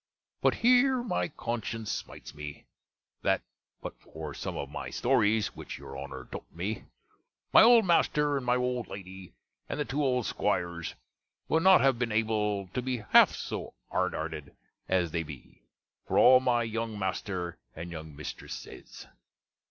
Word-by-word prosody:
But - - +3
here 250 +1 +4
my 220 -7 -1
conscience 115 -6 -4
smites - - -7
me, 75 0 -8 0.6
that, - - +1 0.4
but - - -5
for 80 -2 -8
some - - -5
of 70 - -3
my 75 - -5
stories, 110 -4 +2
which - - -7
your 70 - -10
Honner 70 -2 -7
taute - - -8
me, 95 +6 -4 0.7
my - - +10
old 230 -1 +7
master, 150 -4 +3
and 135 - -1
my 125 0 +2
old 125 -1 -1
lady, 95 -2 -9 0.3
and - - -3
the 150 - 0
two 145 +3 -1
old 125 -4 +1
'squires, 85 -4 -1 0.5
would 160 - +3
not 190 0 +7
have 135 -3 +3
been 120 -2 0
able 105 -2 0
to 125 - -3
be 125 -3 -3
half - - +7
so - - -5 0.2
hardhearted 80 -2 -2 0.3
as 90 -3 +2
they 85 - 0
be, 75 -6 -11 0.5
for - - 0
all 130 0 +8
my 120 -2 +2
younge 115 -1 -3
master 95 -2 -3 0.2
and 85 +2 -7
younge 80 -2 -8
mistress 75 - -6
sayes. - - -11
110 Hz, 160 wpm, -29 LUFS, 85-130 Hz, 0.7 s, my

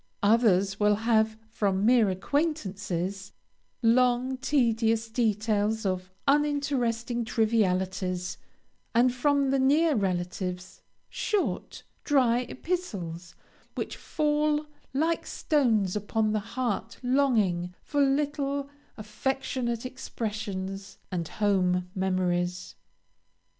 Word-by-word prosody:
Others 200 -3 +3
will 210 0 +4
have, 220 0 +2
from 200 -3 0
mere 235 -3 +5
acquaintances, 195 - -2 0.5
long, 250 +2 +3
tedious 230 -4 +1
details 220 -1 0
of 185 -1 -2 0.2
uninteresting 275 -5 +1
trivialities, 190 -5 0 0.6
and 245 +1 +4
from 280 +1 +2
the 275 - +2
near 300 +5 +4
relatives, 180 -3 -3 0.3
short, 415 -3 -2 0.2
dry 255 -5 +3
epistles, 190 - -4 0.4
which - - -4
fall 300 0 0 0.3
like 320 +5 0
stones 225 - +1
upon 215 +1 0
the 215 - +1
heart 230 0 -3
longing 215 -10 +1
for 290 -1 0
little, 280 0 0 0.3
affectionate 235 +1 -2
expressions, 205 -6 -5
and 170 -3 -2
home 180 -3 +1
memories. 180 -1 -1
225 Hz, 90 wpm, -28 LUFS, 190-265 Hz, 0.6 s, mere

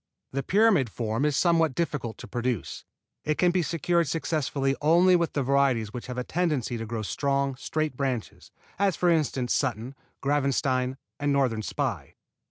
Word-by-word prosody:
The 135 - -1
pyramid 195 - +3
form 115 +4 -2
is 150 -2 +1
somewhat 165 -5 +3
difficult 140 -9 -2
to - - -9
produce. 120 - -3 0.4
It 155 0 0
can 180 -1 +4
be 180 0 +1
secured 170 +1 +1
successfully 140 -3 -1
only 175 +4 +5
with 170 -2 0
the 140 - 0
varieties 130 -5 +2
which 120 - -6
have 125 -1 -6
a 125 - -1
tendency 150 -7 -1
to 115 -1 -5
grow 110 -1 -3
strong, 140 +4 0
straight 155 +2 -2
branches, 125 - -3 0.3
as 195 -3 +2
for 175 -1 +2
instance 140 -6 +1
Sutton, 125 -1 -1 0.3
Gravenstein 135 -2 0 0.2
and 145 0 0
Northern 130 -6 +1
Spy. - - -3
140 Hz, 165 wpm, -27 LUFS, 125-160 Hz, 0.4 s, only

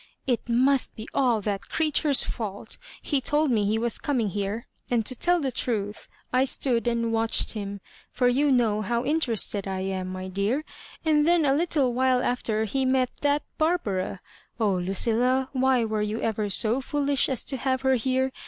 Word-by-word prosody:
*< - - -48
It 245 -2 -1
must 260 +3 +2
be 220 - -8
all 245 -5 +2
that 200 -1 -4
creature*s 305 -3 +2
fault! 215 -2 -6 0.2
He 285 -3 0
told 295 +1 +1
me 215 -3 +2
he 215 +2 +1
was 235 +1 -1
coming 245 -7 0
here; 205 +4 -3 0.2
and 235 -3 +1
to 255 - 0
tell 350 +8 +2
the 275 -4 -2
truth, 210 -5 -3 0.3
I 255 +1 +4
stood 250 -3 +2
and 230 -1 0
watched 225 0 +2
him, 200 -2 -6 0.3
for 250 - +1
you 275 +4 +2
know 225 -5 +2
how 235 +3 -1
in 300 +4 +1
terested 215 -7 0
I 190 -1 -3
am, 190 -1 -3
my 185 0 -6
dear; 200 +10 -1 0.4
and 300 -1 +3
then 340 -2 +4
a 270 - +3
little 285 -5 +1
while 255 0 +2
after 220 -3 -1
he 265 +5 -1
met 260 -1 +1
that 290 0 +1 0.2
Barbara. 205 - -1 0.4
Oh, 210 -3 +2
LuQ^lla^ 235 +8 +1
why 260 -2 +2
were 215 -1 -1
you 210 +2 -2
ever 215 -2 -1
so 225 +6 +2
foolish 285 0 0
as 260 -4 0
to 270 - -2
have 260 0 -1
her 265 0 +3
here 260 +2 0
245 Hz, 190 wpm, -26 LUFS, 215-270 Hz, 0.4 s, I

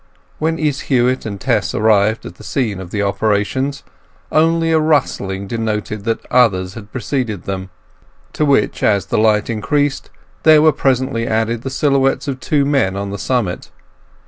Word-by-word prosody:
When 160 +1 0
Izz 150 -4 -1
Huett 125 -2 +1
and 100 -2 -6
Tess - - 0
arrived 110 0 +2
at - - -8
the - - -15
scene 110 -8 -2
of 95 -1 -9
operations 105 +7 0 0.5
only 165 +1 +2
a 160 - +4
rustling 100 -11 0
denoted 110 -1 -3
that 115 -1 -2
others 95 -7 +3
had 105 -1 -11
preceded 120 -6 -3
them; 95 -1 -5 0.6
to - - -1
which, 140 -7 +2
as 100 -2 +2
the 95 - 0
light 105 -1 +3
increased, 140 +6 -1 0.3
there 155 -1 +6
were 155 - +6
presently 130 -4 0
added 110 +1 0
the 135 - -4
silhouettes 135 0 +1
of 135 -2 -3
two 145 +1 +1
men 135 -10 +1
on 100 0 -4
the 100 - -5
summit. 110 -6 -2
115 Hz, 160 wpm, -17 LUFS, 105-140 Hz, 0.6 s, there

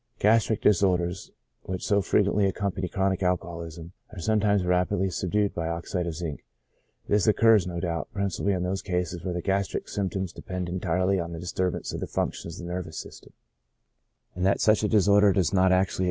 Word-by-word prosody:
Gastric 110 0 +3
disorders, 90 -2 +2 0.4
which 95 -1 -4
so 100 0 +3
frequently 100 +1 +2
accompany 95 -1 -2
chronic 95 +2 0
alcoholism, 85 -2 -3 0.2
are 105 - -9
sometimes 105 0 +2
rapidly 90 +1 +1
subdued 100 +4 0
by 85 -1 -3
oxide 85 +1 -3
of 85 - -4
zinc; 80 -3 -5 0.6
this 105 -1 +2
occurs, 110 -3 +5
no 85 -1 -4
doubt, 85 -2 -2
principally 100 -2 -1
in 90 -1 -1
those 95 +2 -2
cases 90 -1 -3
where 90 -2 -3
the 90 - -3
gastric 100 0 -1
symp 100 -2 -2
toms 95 -3 -3
depend 90 -2 -5
entirely 90 +1 0
on 85 0 -4
the 80 - -6
disturbance 90 +1 -2
of - - -4
the - - -4
functions 85 +1 -3
of 90 - -7
the 90 - -5
nervous 90 -3 -5
system - - -10
j - - -31
and 90 - -2
that 95 - +3
such 110 0 +4
a - - +3
disorder 100 -1 +5
does 90 -5 +2
actually 100 - 0
lOO 95 - +5
CHRONIC 90 - +5
ALCOHOLISM. 95 -1 -2
90 Hz, 195 wpm, -26 LUFS, 85-100 Hz, 0.6 s, occurs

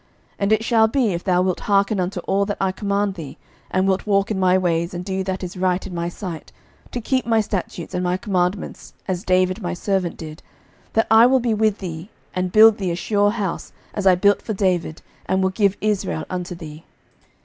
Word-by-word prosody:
11:011:038 - - -37 0.3
And 200 +1 0
it 220 0 +1
shall 225 -1 +4
be, 225 -3 +1
if 170 - -4
thou 180 -2 +2
wilt 185 -1 -1
hearken 200 0 +1
unto 180 0 -2
all 195 +3 +1
that 205 - -3
I 190 -1 +1
command 200 +1 -1
thee, 155 -7 -9 0.3
and 185 +1 +1
wilt 190 +2 0
walk 200 0 +2
in 200 - -1
my 185 0 +4
ways, 170 -1 0
and 175 +1 -5
do 190 -1 -2
that 190 0 -3
is 180 +1 -6
right 185 0 0
in 190 - -7
my 170 0 -2
sight, 175 -3 -7 0.4
to 245 - -4
keep 255 +2 -1
my 225 -1 +3
statutes 190 -5 -4
and 180 - -1
my 180 0 0
commandments, 190 -2 -2
as 185 -1 -2
David 185 +2 +1
my 180 -1 -3
servant 190 -1 -1
did; 155 -1 -9 0.5
that 225 - +3
I 225 +2 +8
will 260 +1 +4
be 235 -2 0
with 215 -1 +1
thee, 170 0 -7 0.2
and 185 -1 -2
build 220 +1 +7
thee 190 -2 -1
a 170 - -1
sure 205 +3 +1
house, 205 -5 -3 0.2
as 200 -2 -1
I 185 - +7
built 200 +3 +3
for 220 - -4
David, 180 -5 -1 0.2
and 190 0 +1
will 190 - +1
give 200 0 +1
Israel 90 - -1
unto 180 0 -4
thee. 155 -1 -10
190 Hz, 220 wpm, -21 LUFS, 180-205 Hz, 0.5 s, I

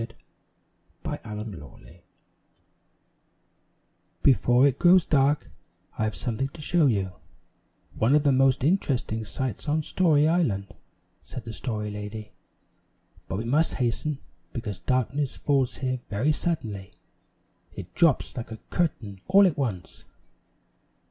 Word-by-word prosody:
XVIII 115 - -9 0.9
TINY'S - - -4
ADVENTURES 105 0 -6
IN 85 - -8
TINYTOWN 75 +4 -15 2.2
"BEFORE 125 0 +5
it 135 -1 -1
grows 180 0 +6
dark, 145 0 +2 0.5
I 110 - +2
have 110 - -2
something 125 +3 -2
to 150 - -14
show 155 0 +3
you 100 -6 0 0.8
one 120 +6 +3
of 150 - +3
the 145 - +4
most 135 -1 +3
interesting 135 - 0
sights 130 +4 -4
on 155 +1 +1
Story 155 -3 +3
Island," 105 - 0 0.5
said 130 -2 -8
the 115 - -7
Story 105 -3 -3
Lady. 105 +1 -7 1.0
"But 95 - -3
we 110 - -3
must 150 +7 +2
hasten, 130 +4 -1 0.4
because 105 -6 -5
darkness 130 +7 -1
falls 135 -4 +1
here 130 -1 -2
very 115 +9 +1
suddenly; 115 - -3 0.8
it 90 -2 -8
drops 165 -6 +2
like 120 - -5
a 110 - -6
curtain 110 - -2
all 195 +2 +7
at 180 - +2
once." 110 -11 -4
130 Hz, 130 wpm, -26 LUFS, 105-150 Hz, 2.2 s, all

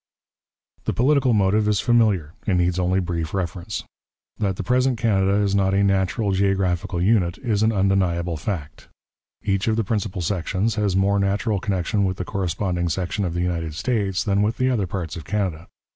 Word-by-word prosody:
The - - 0
political 135 0 +3
motive 105 0 +2
is 105 -2 +2
familiar 105 -11 +2
and 95 -3 +2
needs 90 0 +1
only 90 +1 +2
brief 85 -2 -3
reference. 90 -2 -3 0.6
That 100 -3 0
the - - -4
present 125 0 +2
Canada 100 -4 +2
is 100 -1 +1
not 95 -1 +2
a 100 - +3
natural 100 +2 +1
geographical 95 -1 0
unit 90 -2 +2
is 110 -6 -1
an 110 +1 +3
undeniable 95 -4 +1
fact. 75 -2 -5 0.6
Each 100 0 0
of 110 - +2
the 115 - +1
principal 100 -3 -2
sections 95 +5 -1
has 105 -3 0
more 100 +1 +2
natural 100 +2 0
connection 100 +1 -1
with 95 -1 -1
the 90 - -4
corresponding 90 -2 -2
section 95 +3 -2
of 85 -1 -3
the 85 - 0
United 85 -3 -2
States 95 0 0
than 100 -1 +1
with 110 +2 0
the 130 0 +2
other 105 -7 0
parts 85 -3 -4
of 85 - -7
Canada. 90 -1 -2
95 Hz, 180 wpm, -23 LUFS, 90-105 Hz, 0.6 s, political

